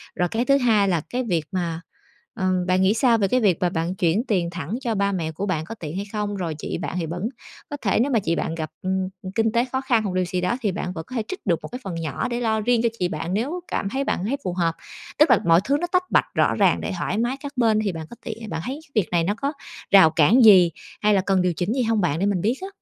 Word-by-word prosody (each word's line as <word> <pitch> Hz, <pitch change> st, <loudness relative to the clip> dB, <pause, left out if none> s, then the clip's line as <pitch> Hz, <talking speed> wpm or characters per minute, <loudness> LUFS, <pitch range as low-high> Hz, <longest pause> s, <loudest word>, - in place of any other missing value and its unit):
rồi 180 Hz, -1 st, 0 dB
cái 235 Hz, +2 st, -1 dB
thứ 275 Hz, +1 st, +4 dB
hai 220 Hz, -6 st, +3 dB
là 170 Hz, -4 st, +1 dB
cái 250 Hz, +1 st, -2 dB
việc 170 Hz, -8 st, -1 dB
mà 170 Hz, -3 st, -2 dB, 0.6 s
ừm, 185 Hz, -1 st, +1 dB
bạn 185 Hz, +1 st, +2 dB
nghĩ 190 Hz, +3 st, +4 dB
sao 230 Hz, -1 st, +3 dB
về 200 Hz, -, +1 dB
cái 255 Hz, +6 st, +2 dB
việc 195 Hz, -8 st, +3 dB
mà 180 Hz, -, +2 dB
bạn 170 Hz, +1 st, -2 dB
chuyển 180 Hz, +5 st, +1 dB
tiền 180 Hz, -5 st, +1 dB
thẳng 170 Hz, +3 st, -4 dB
cho 230 Hz, -3 st, -1 dB
ba 200 Hz, 0 st, +1 dB
mẹ 165 Hz, -4 st, -2 dB
của 190 Hz, +6 st, -4 dB
bạn 160 Hz, -5 st, -2 dB
có 225 Hz, +6 st, -7 dB
tiện 160 Hz, -6 st, -7 dB
hay 200 Hz, -, -3 dB
không, 210 Hz, -1 st, -2 dB
rồi 170 Hz, -5 st, -3 dB
chị -, -, -4 dB
bạn -, -, -5 dB
thì 165 Hz, -, -2 dB
vẫn 170 Hz, +2 st, -5 dB, 0.5 s
có 290 Hz, -, -5 dB
thể 200 Hz, 0 st, +1 dB
nếu 275 Hz, +4 st, +1 dB
mà 230 Hz, -, +3 dB
chị 170 Hz, -4 st, -1 dB
bạn 165 Hz, -, -2 dB
gặp, 155 Hz, -2 st, -5 dB
ừm, 190 Hz, 0 st, -1 dB, 0.3 s
kinh 225 Hz, -1 st, +2 dB
tế 235 Hz, +2 st, +2 dB
khó 260 Hz, 0 st, -1 dB
khăn 240 Hz, -5 st, +1 dB
hoặc 195 Hz, -, -3 dB
điều 185 Hz, 0 st, +1 dB
gì 180 Hz, +1 st, -2 dB
đó 235 Hz, +7 st, 0 dB
thì 210 Hz, -, 0 dB
bạn 180 Hz, -1 st, -4 dB
vẫn 160 Hz, -2 st, -6 dB
có 255 Hz, -, -8 dB
thể 225 Hz, -, 0 dB
trích 375 Hz, -, -7 dB
được 175 Hz, -5 st, +1 dB
một -, -, -5 dB
cái 250 Hz, -, -6 dB
phần 190 Hz, -5 st, -5 dB
nhỏ 160 Hz, -5 st, -3 dB
để 240 Hz, 0 st, -2 dB
lo 220 Hz, -2 st, +1 dB
riêng 235 Hz, +1 st, +2 dB
cho 235 Hz, -, +3 dB
chị 180 Hz, -, +1 dB
bạn 170 Hz, +1 st, -4 dB
nếu 285 Hz, -, -2 dB
cảm 195 Hz, -, -2 dB
thấy 270 Hz, +5 st, -1 dB
bạn 185 Hz, -, -1 dB
thấy 275 Hz, +5 st, -1 dB
phù 180 Hz, -, -1 dB
hợp. 170 Hz, -2 st, 0 dB, 0.4 s
Tức 300 Hz, -1 st, +6 dB
là 235 Hz, -, +6 dB
mọi 170 Hz, +1 st, +5 dB
thứ 280 Hz, +4 st, +2 dB
nó 350 Hz, -, -1 dB
tách 365 Hz, 0 st, +1 dB
bạch -, -, +4 dB
rõ -, -, +3 dB
ràng -, -, +3 dB
để -, -, -3 dB
thoải 195 Hz, -, -2 dB
mái 240 Hz, +4 st, 0 dB
các 285 Hz, -, -6 dB
bên 225 Hz, -3 st, +3 dB
thì 200 Hz, -, 0 dB
bạn 160 Hz, -2 st, -6 dB
có -, -, -10 dB
tiện 225 Hz, -2 st, -6 dB
bạn 160 Hz, 0 st, -3 dB
thấy 270 Hz, +4 st, -4 dB
cái 290 Hz, -, -24 dB
việc 175 Hz, -, -9 dB
này 170 Hz, -1 st, +2 dB
nó 205 Hz, +4 st, 0 dB
có 280 Hz, +2 st, -1 dB, 0.4 s
rào 190 Hz, -5 st, +8 dB
cản 170 Hz, -, +5 dB
gì 185 Hz, -5 st, +8 dB, 0.3 s
hay 210 Hz, 0 st, +4 dB
là 195 Hz, -, +3 dB
cần 190 Hz, -1 st, +1 dB
điều 180 Hz, -1 st, +1 dB
chỉnh 180 Hz, +7 st, -1 dB
gì 260 Hz, -, 0 dB
hông 225 Hz, -2 st, +1 dB
bạn 165 Hz, -4 st, 0 dB
để 195 Hz, -, +1 dB
mình 195 Hz, -4 st, 0 dB
biết 230 Hz, +5 st, +1 dB
á? 380 Hz, -, -4 dB
200 Hz, 300 wpm, -23 LUFS, 175-235 Hz, 0.6 s, rào